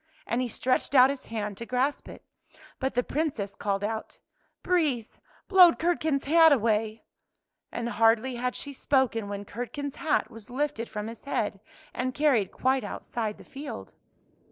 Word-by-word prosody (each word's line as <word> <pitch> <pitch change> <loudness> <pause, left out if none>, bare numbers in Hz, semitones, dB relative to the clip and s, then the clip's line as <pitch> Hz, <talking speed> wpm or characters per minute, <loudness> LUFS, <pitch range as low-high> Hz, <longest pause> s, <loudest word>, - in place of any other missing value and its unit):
And 235 +2 0
he 255 - -1
stretched 255 +4 -1
out 260 +1 +8
his 280 - -7
hand 210 -3 -4
to 235 - -6
grasp 260 +3 -1
it. - - -12 0.5
But 265 -2 -2
the 245 - +2
Princess 270 -11 -2
called 200 0 -2
out, 220 +1 -4 0.2
" - - -44
Breeze, 295 -11 0 0.3
blow 365 -3 +8
Curdken's 315 -4 0
hat 325 +2 +6
away! 220 -3 +1 0.3
" - - -56
And 235 0 -3
hardly 235 +2 +2
had 250 +1 -2
she 285 - -6
spoken 255 -6 +1
when 200 0 -5
Curd 240 +6 -6
ken's 285 -2 -5
hat 315 - 0
was 225 +1 -11
lifted 265 -2 -2
from 210 0 -4
his 230 +3 -9
head, 210 -7 -1 0.3
and 255 0 -2
carried 265 -10 +2
quite 260 0 +1
outside 220 -3 -4
the - - -13
field. 285 +2 -8
250 Hz, 170 wpm, -27 LUFS, 225-285 Hz, 0.5 s, out